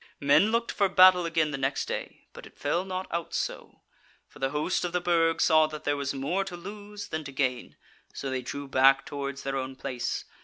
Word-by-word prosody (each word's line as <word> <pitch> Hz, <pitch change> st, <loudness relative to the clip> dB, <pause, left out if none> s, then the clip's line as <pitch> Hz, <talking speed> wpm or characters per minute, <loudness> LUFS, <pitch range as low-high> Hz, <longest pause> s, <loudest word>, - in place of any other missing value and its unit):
"Men 145 Hz, +10 st, +4 dB
looked 230 Hz, 0 st, 0 dB
for 200 Hz, -2 st, +1 dB
battle 185 Hz, -2 st, +6 dB
again 160 Hz, -2 st, +1 dB
the 140 Hz, -, -4 dB
next 135 Hz, +1 st, -1 dB
day; -, -, -6 dB
but -, -, -11 dB
it -, -, -21 dB
fell 170 Hz, +5 st, 0 dB
not 185 Hz, 0 st, -4 dB
out 170 Hz, -1 st, -3 dB
so; -, -, -4 dB, 0.5 s
for -, -, -17 dB
the 135 Hz, -, 0 dB
host 150 Hz, +7 st, -1 dB
of 175 Hz, -, -3 dB
the 180 Hz, -, +2 dB
Burg 165 Hz, -2 st, +2 dB
saw 155 Hz, -1 st, +5 dB
that 155 Hz, -1 st, -8 dB
there 145 Hz, -, +1 dB
was 140 Hz, -1 st, -2 dB
more 145 Hz, +8 st, -1 dB
to 185 Hz, -2 st, -7 dB
lose 205 Hz, +2 st, -9 dB
than 155 Hz, -1 st, -3 dB
to 140 Hz, -, -8 dB
gain, 130 Hz, -3 st, -2 dB, 0.4 s
so 135 Hz, -, -5 dB
they 130 Hz, -1 st, -2 dB
drew 140 Hz, +3 st, -6 dB
back 135 Hz, +1 st, +4 dB
towards 140 Hz, -2 st, -5 dB
their 135 Hz, 0 st, -2 dB
own 130 Hz, 0 st, -4 dB
place. 130 Hz, -2 st, -4 dB
155 Hz, 220 wpm, -28 LUFS, 135-180 Hz, 0.5 s, battle